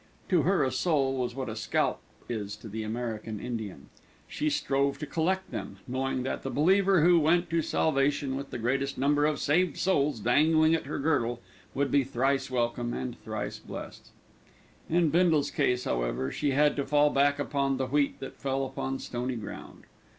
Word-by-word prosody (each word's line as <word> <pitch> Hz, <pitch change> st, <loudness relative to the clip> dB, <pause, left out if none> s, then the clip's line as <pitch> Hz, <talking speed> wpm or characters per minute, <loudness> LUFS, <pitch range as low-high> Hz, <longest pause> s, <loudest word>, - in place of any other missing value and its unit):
To 180 Hz, -4 st, +4 dB
her, 185 Hz, +4 st, +2 dB
a 130 Hz, -, 0 dB
soul 140 Hz, -6 st, +1 dB
was 125 Hz, -1 st, -2 dB
what 135 Hz, -1 st, -4 dB
a 110 Hz, -, -4 dB
scalp 110 Hz, -, 0 dB, 0.3 s
is 105 Hz, -3 st, -4 dB
to 105 Hz, +1 st, -11 dB
the 110 Hz, +1 st, -5 dB
American 110 Hz, -1 st, -4 dB
Indian. 110 Hz, -, -6 dB, 0.4 s
She 305 Hz, +1 st, -1 dB
strove 140 Hz, -, 0 dB
to 150 Hz, -, -5 dB
collect 185 Hz, +4 st, -1 dB
them, 100 Hz, -, -6 dB
knowing 130 Hz, 0 st, -1 dB
that 130 Hz, -, -3 dB
the 135 Hz, -, -4 dB
believer 190 Hz, +4 st, +3 dB
who 175 Hz, 0 st, +6 dB
went 170 Hz, +3 st, +2 dB
to 165 Hz, 0 st, +2 dB
salvation 140 Hz, -3 st, +1 dB
with 140 Hz, +1 st, -5 dB
the -, -, -5 dB
greatest 135 Hz, +4 st, -1 dB
number 145 Hz, +3 st, +3 dB
of 150 Hz, -1 st, 0 dB
saved 175 Hz, +5 st, +1 dB
souls 145 Hz, -9 st, +1 dB
dangling 155 Hz, +7 st, +4 dB
at 165 Hz, -, -1 dB
her -, -, -3 dB
girdle, 120 Hz, -6 st, 0 dB, 0.4 s
would 140 Hz, -1 st, 0 dB
be 140 Hz, -1 st, +4 dB
thrice 135 Hz, +1 st, 0 dB
welcome, 120 Hz, -1 st, -1 dB
and 125 Hz, -2 st, -4 dB
thrice 110 Hz, -1 st, -4 dB
blessed. -, -, -9 dB, 0.8 s
In 170 Hz, -1 st, +3 dB
Bindle's 165 Hz, -3 st, +3 dB
case, 125 Hz, 0 st, +1 dB
however, -, -, -1 dB
she 145 Hz, -, -1 dB
had 145 Hz, +2 st, +3 dB
to 140 Hz, -, +1 dB
fall 145 Hz, +1 st, +4 dB
back 140 Hz, +1 st, +3 dB
upon 140 Hz, -1 st, 0 dB
the 130 Hz, -, -1 dB
wheat 140 Hz, +2 st, 0 dB
that 135 Hz, -, -7 dB
fell 135 Hz, 0 st, -1 dB
upon 135 Hz, 0 st, -3 dB
stony 125 Hz, 0 st, -4 dB
ground. 110 Hz, -3 st, -8 dB
135 Hz, 180 wpm, -28 LUFS, 125-150 Hz, 0.8 s, who